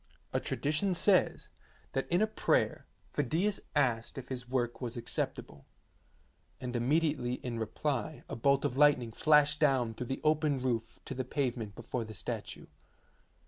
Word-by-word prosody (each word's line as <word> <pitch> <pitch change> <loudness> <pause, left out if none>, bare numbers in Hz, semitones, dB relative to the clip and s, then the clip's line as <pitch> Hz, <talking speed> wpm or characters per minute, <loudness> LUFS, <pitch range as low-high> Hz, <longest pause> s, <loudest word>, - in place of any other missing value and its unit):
A - - +2
tradition 155 +6 0
says 185 +1 +3 0.4
that 135 - -1
in 175 +5 +4
a - - +5
prayer 220 - +1 0.3
Phidias 165 +9 +1 0.2
asked 120 -5 +1
if 130 -1 -7
his 125 -2 -5
work 120 -2 -1
was 120 -1 -4
acceptable, 70 -10 -4 0.9
and 125 -1 -5
immediately 130 0 +1
in 120 -2 -5
reply 135 +6 -2
a - - -5
bolt 140 +3 +2
of 125 - -1
lightning 140 -5 +4
flashed 150 +3 +4
down 130 -6 +3
through 125 +2 -5
the 135 - -3
open 155 -2 +2
roof 120 -3 -2
to - - -4
the 130 0 -2
pavement 125 -6 -2
before 120 +1 -4
the 110 -1 -9
statue. - - -5
130 Hz, 150 wpm, -32 LUFS, 120-150 Hz, 0.9 s, a